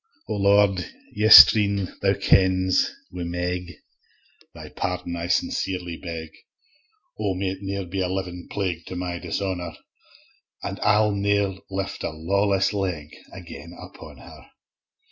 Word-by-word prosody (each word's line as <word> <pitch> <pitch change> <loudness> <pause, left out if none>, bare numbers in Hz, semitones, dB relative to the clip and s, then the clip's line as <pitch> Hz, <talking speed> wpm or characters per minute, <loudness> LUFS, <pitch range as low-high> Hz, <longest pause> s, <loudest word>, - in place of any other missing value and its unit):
O - - -3
Lord! 100 -2 +3 0.3
yestreen, 105 -2 +7
Thou 100 0 +2
kens, 95 -1 +3 0.2
wi' 90 - -7
Meg 90 +1 -3 0.8
Thy - - -11
pardon 90 -2 -4
I 85 0 -4
sincerely 90 -1 -1
beg, 80 -2 -7 0.9
O! 100 -3 -1
may't 95 0 -3
ne'er 100 -1 -4
be 95 +2 -3
a 90 - -1
livin 90 -2 -5
plague 90 -5 -3
To 95 - -6
my 90 -1 -4
dishonour, 90 -1 -4 0.9
An' - - -5
I'll 105 0 +3
ne'er 100 -1 0
lift 95 0 -4
a - - -1
lawless 100 +4 0
leg 90 -7 -3 0.2
Again 85 +5 -11
upon - - -12
her. - - -14
95 Hz, 125 wpm, -24 LUFS, 90-100 Hz, 0.9 s, yestreen